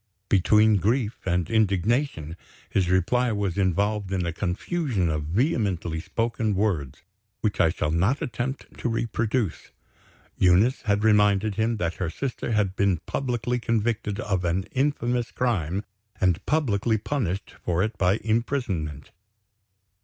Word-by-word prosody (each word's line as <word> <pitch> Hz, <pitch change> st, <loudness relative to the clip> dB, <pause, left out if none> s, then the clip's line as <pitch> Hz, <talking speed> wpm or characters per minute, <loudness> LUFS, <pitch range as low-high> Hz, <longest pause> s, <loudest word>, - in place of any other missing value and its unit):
Between 105 Hz, +2 st, +4 dB
grief 110 Hz, +4 st, 0 dB
and 90 Hz, -2 st, +1 dB
indignation 105 Hz, -, +1 dB, 0.3 s
his 95 Hz, -3 st, 0 dB
reply 115 Hz, +7 st, +2 dB
was 100 Hz, -4 st, -1 dB
involved 100 Hz, +1 st, 0 dB
in 95 Hz, -2 st, 0 dB
a 85 Hz, -, -2 dB
confusion 100 Hz, -, -1 dB
of 75 Hz, -1 st, -2 dB
vehemently 95 Hz, -, 0 dB
spoken 115 Hz, +3 st, -1 dB
words, 80 Hz, -8 st, -1 dB, 0.4 s
which 105 Hz, -4 st, +1 dB
I 80 Hz, -, +5 dB
shall 75 Hz, -2 st, -1 dB
not 95 Hz, -, +2 dB
attempt 125 Hz, +3 st, -4 dB
to -, -, -1 dB
reproduce. 115 Hz, -3 st, -1 dB, 0.7 s
Eunice 95 Hz, +8 st, +4 dB
had 105 Hz, 0 st, +1 dB
reminded 105 Hz, -1 st, +4 dB
him 110 Hz, +2 st, 0 dB
that 85 Hz, -4 st, -2 dB
her 85 Hz, -, 0 dB
sister 125 Hz, -, -4 dB
had 100 Hz, -3 st, +1 dB
been 100 Hz, -3 st, +2 dB
publicly 125 Hz, -2 st, -1 dB
convicted 115 Hz, -3 st, -1 dB
of 95 Hz, -3 st, -1 dB
an 90 Hz, +2 st, 0 dB
infamous 125 Hz, -3 st, 0 dB
crime, 100 Hz, -7 st, -1 dB, 0.4 s
and 90 Hz, -4 st, +2 dB
publicly 115 Hz, -7 st, +1 dB
punished 100 Hz, -5 st, -3 dB
for 90 Hz, +1 st, +1 dB
it 110 Hz, +1 st, -2 dB
by 90 Hz, +1 st, +3 dB
imprisonment. 110 Hz, -, -2 dB
105 Hz, 130 wpm, -25 LUFS, 90-115 Hz, 0.7 s, I